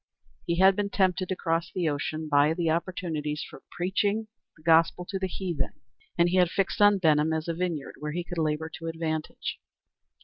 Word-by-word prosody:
He 170 - +1
had 190 +1 +6
been 205 0 -1
tempted 185 -2 +1
to 185 - 0
cross 165 -1 -1
the 175 -3 -1
ocean 155 +1 -2
by 145 +2 +4
the 165 -2 +1
opportunities 160 -3 -2
for - - -12
preaching 200 +4 0 0.3
the 155 - -20
gospel 165 +2 +4
to 195 +1 -4
the 190 - -1
heathen, 175 -6 -3 0.4
and 170 0 +5
he 180 +2 +1
had 180 -2 +5
fixed 195 +3 -1
on 205 0 +7
Benham 155 -3 +3
as 160 0 -2
a 170 - 0
vineyard 165 -4 -3
where 150 0 -4
he 175 +3 -3
could 170 0 -5
labor 155 0 0
to 165 - -6
advantage. 160 -1 -3
170 Hz, 195 wpm, -27 LUFS, 155-185 Hz, 0.4 s, on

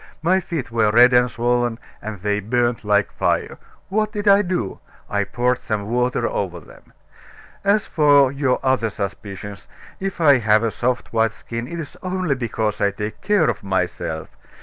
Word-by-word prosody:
My 185 +3 +3
feet 165 -10 -5
were 110 -2 +2
red 120 +3 +6
and 125 0 +4
swollen, 120 0 0 0.2
and 105 -3 -7
they 105 +1 0
burned 120 +3 0
like 105 -1 +2
fire. - - -1 0.3
What 215 +2 0
did 210 -1 -4
I 200 0 +7
do? 175 - -3 0.3
I 100 0 0
poured 125 +3 0
some 105 -2 -3
water 125 -1 +1
over 90 -3 -3
them. 75 - -18 0.7
As 200 +1 +2
for 145 -3 +4
your 135 -2 0
other 130 -4 +1
suspicions, 100 0 -6 0.3
if 195 -1 -4
I 145 -5 +6
have 110 -1 +3
a 115 - 0
soft 125 +1 -2
white 115 -1 +2
skin, 115 +1 -6
it 170 +4 -6
is 155 -4 -8
only 185 -4 -1
because 110 -4 -2
I 100 - +4
take 105 +2 -6
care 205 -7 +3
of - - -1
myself. 90 -5 -3
120 Hz, 170 wpm, -21 LUFS, 105-145 Hz, 0.7 s, I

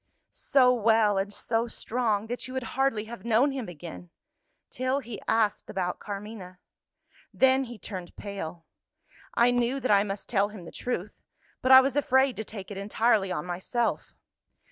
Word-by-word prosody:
"So 255 -2 +4
well 220 -3 +3
and 195 +1 -2
so 225 +3 -1
strong 220 -3 -1
that 245 +3 -4
you 255 - -8
would 260 - -2
hardly 270 -5 +1
have 230 +2 -9
known 235 +5 +3
him 260 -7 -5
again 90 - -9 0.6
till 255 +2 0
he 235 -7 -6
asked 220 -2 +1
about 180 -2 -2
Carmina. 200 -3 -7 0.7
Then 265 0 +3
he 240 -1 -9
turned 185 -2 -8
pale. 175 -5 -7 0.7
I 240 +1 +5
knew 245 +2 +1
that 255 -3 0
I 200 -1 +6
must 200 -1 -5
tell 205 -3 +1
him 205 -5 -10
the - - -9
truth 210 -5 -4 0.4
but 260 - +2
I 260 0 +11
was 265 0 -1
afraid 265 -2 +3
to 220 - -3
take 205 -2 -9
it 200 - -6
entirely 210 -1 +1
on - - -3
myself. 190 +7 -2
220 Hz, 165 wpm, -27 LUFS, 200-250 Hz, 0.7 s, I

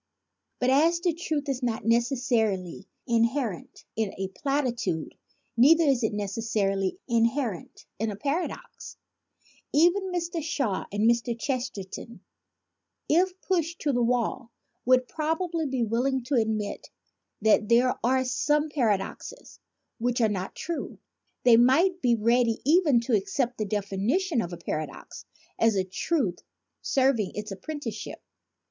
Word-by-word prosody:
But 250 +1 +2
as 325 +5 +4
the 345 -1 +1
truth 310 -3 -3
is 270 -2 -2
not 230 -4 -2
necessarily 230 -6 0 0.2
inherent 230 - -1
in 220 -3 -2
a 190 0 -3
platitude, 240 - -2 0.4
neither 310 +8 +6
is 270 -5 +2
it 220 - +1
necessarily 200 - -1
inherent 230 - -1
in 225 +1 0
a 205 - -4
paradox. 285 - -4 0.7
Even 355 +5 +3
Mr. 340 -1 -2
Shaw 275 -9 -2
and 205 +2 +1
Mr. 235 0 +1
Chesterton, 235 -4 -5 0.9
if 365 +3 +2
pushed 340 -2 -1
to 285 - 0
the 245 - +1
wall, 240 0 0 0.4
would 255 0 +4
probably 325 +1 -2
be 260 -3 -1
willing 245 +4 0
to 255 - -4
admit 220 -4 -1 0.5
that 215 -1 +3
there 245 +2 +4
are 260 +2 +2
some 295 +4 +1
paradoxes 235 - -2 0.4
which 245 +1 0
are 225 -2 +3
not 190 -2 -4
true. 335 0 -5 0.5
They 235 -2 +7
might 330 +10 +4
be 240 -2 +3
ready 230 +1 +2
even 300 -5 +4
to 235 -1 +1
accept 240 +5 -1
the 215 - -1
defini 200 - 0
tion 360 -11 0
of 175 - -5
a 175 - -6
paradox 155 -1 -6 0.3
as 225 -2 +3
a 190 - +2
truth 190 - -1 0.4
serving 260 -7 +1
its 210 0 -5
appren 290 +11 -6
ticeship. - - -6
245 Hz, 135 wpm, -27 LUFS, 215-290 Hz, 0.9 s, They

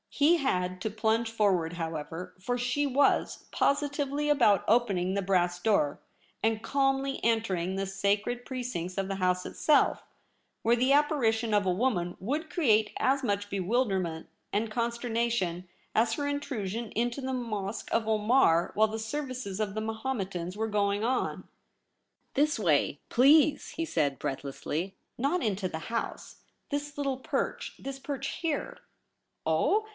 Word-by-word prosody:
He 310 +4 +4
had 185 - -1
to 220 - -1
plunge 220 +2 +1
forward, 190 -7 +1
however, 165 +2 -5
for 245 +6 -1
she 245 +4 0
was 280 +1 +2
positively 285 0 0
about 240 -9 +4
opening 200 -5 +2
the 200 - 0
brass 180 -2 +1
door, 175 -8 +1 0.4
and 220 -1 +1
calmly 270 0 +1
entering 195 -6 +1
the 195 0 -1
sacred 200 +5 0
precincts 240 -10 -4
of 195 -1 0
the 195 - -2
House 180 -1 +1
itself, 300 -2 +2 0.6
where 230 +2 +4
the 255 +3 +2
apparition 240 -7 +2
of 205 -1 +3
a 185 - +2
woman 180 -5 0
would 295 - -2
create 220 -11 +3
as 270 +1 +2
much 205 -3 -1
bewilderment 190 -5 -1 0.2
and 215 +2 -1
consternation 235 -6 -1 0.3
as 225 +1 +3
her 285 +4 -2
Intrusion 235 -6 -3
into 240 +4 -1
the 260 0 -3
Mosque 215 -5 -3
of 225 -1 +1
Omar 215 -5 +3
while 220 +1 +4
the 220 +1 -4
services 255 -4 -4
of 210 -2 -2
the 215 - -1
Mahometans 205 -6 -3
were 220 +1 0
going 205 -1 +1
on. 250 +2 -1 0.4
' - - -48
This 295 -2 +2
way, 150 -6 +2
please,' 290 +3 +5
he 330 - -3
said 145 - 0
breathlessly; 145 +6 -4 0.2
'not 285 +8 0
into 195 -3 0
the 160 -2 -6
House. 230 0 -4 0.3
This 290 0 -3
little 275 -2 -1
perch 260 - -3
— - - -28
this 275 0 -6
perch 275 -1 -4
here.' 330 +9 -2 0.4
' - - -52
Oh 435 +1 +2
220 Hz, 150 wpm, -29 LUFS, 190-265 Hz, 0.6 s, please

